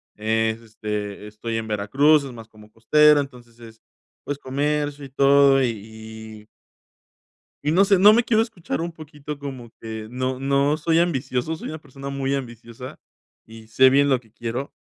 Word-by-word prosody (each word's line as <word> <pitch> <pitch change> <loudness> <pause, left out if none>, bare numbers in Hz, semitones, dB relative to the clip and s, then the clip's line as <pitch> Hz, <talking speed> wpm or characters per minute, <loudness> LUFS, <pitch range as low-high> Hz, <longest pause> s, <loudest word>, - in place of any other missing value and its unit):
Es, 110 +1 0
este, 105 -2 -6
estoy 110 +2 -6
en 110 0 -4
Veracruz, 135 +9 +3
es 135 - -7
más 115 -1 -12
como 105 -1 -17
costera. 150 +7 +4
Entonces, 125 -4 -11
es, 115 -1 -14 0.5
pues, 145 - -3
comercio 145 +1 -2
y - - -11
todo 140 0 +4
y - - +2
y 110 0 -9 1.2
Y 150 - +1
no 185 +5 +5
sé, 195 -1 +3
no 205 +3 +8
me 235 +2 +3
quiero 220 -2 +2
escuchar 210 -10 -4
un 170 +1 -4
poquito 150 -2 -9
como 135 -4 -8
que 110 -1 -7
no 130 +1 -3
no 140 +2 +1
soy 165 +1 +1
ambicioso. 135 -3 -1
Soy - - -7
una 155 - -6
persona 140 -1 -9
muy 140 0 -2
ambiciosa 120 -1 -7 0.5
y 110 0 -14
sé 130 +4 +5
bien 140 +2 +4
lo 130 -3 +2
que 110 -3 -25
quiero, 120 +5 -5
130 Hz, 175 wpm, -23 LUFS, 110-145 Hz, 1.2 s, no